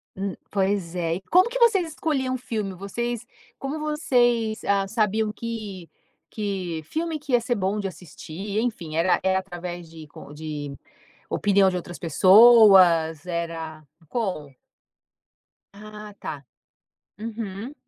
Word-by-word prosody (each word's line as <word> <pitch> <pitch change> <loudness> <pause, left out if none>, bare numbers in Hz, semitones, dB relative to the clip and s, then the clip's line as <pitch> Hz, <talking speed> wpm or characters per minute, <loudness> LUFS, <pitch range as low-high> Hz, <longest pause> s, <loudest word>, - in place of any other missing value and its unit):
Hum, 195 -1 -3 0.2
pois 195 -3 0
é. 165 -1 -1
E 190 - -6
como 365 - +4
que - - -3
vocês 405 -8 +4
escolhiam 275 -5 -1
um - - -2
filme? 215 -5 -4
Vocês 235 +5 -4 0.3
como 280 +3 -4
vocês, 245 -7 +1
ah, 200 -1 +2
sabiam 215 0 0
que 210 -6 -6 0.4
que 190 -6 -3
filme 320 - -3
que 290 -2 -9
ia 240 -1 +4
ser 240 0 -1
bom 200 +1 -1
de 195 - -2
assistir? 185 +4 -6
Enfim, 185 -10 -3
era 170 +3 +3
era 190 0 +2
através 175 -2 -7
de 160 -2 -11
com 145 - -12
de 150 -2 -6 0.5
opinião 200 -1 +3
de 180 - -3
outras 175 0 -6
pessoas? 185 -4 +6
Era 165 -2 -4 0.3
como? 180 - -3 1.2
Ah, 210 0 -10
tá. 140 -3 -6 0.7
Uhum. 220 +3 -6
200 Hz, 135 wpm, -24 LUFS, 175-230 Hz, 1.2 s, pessoas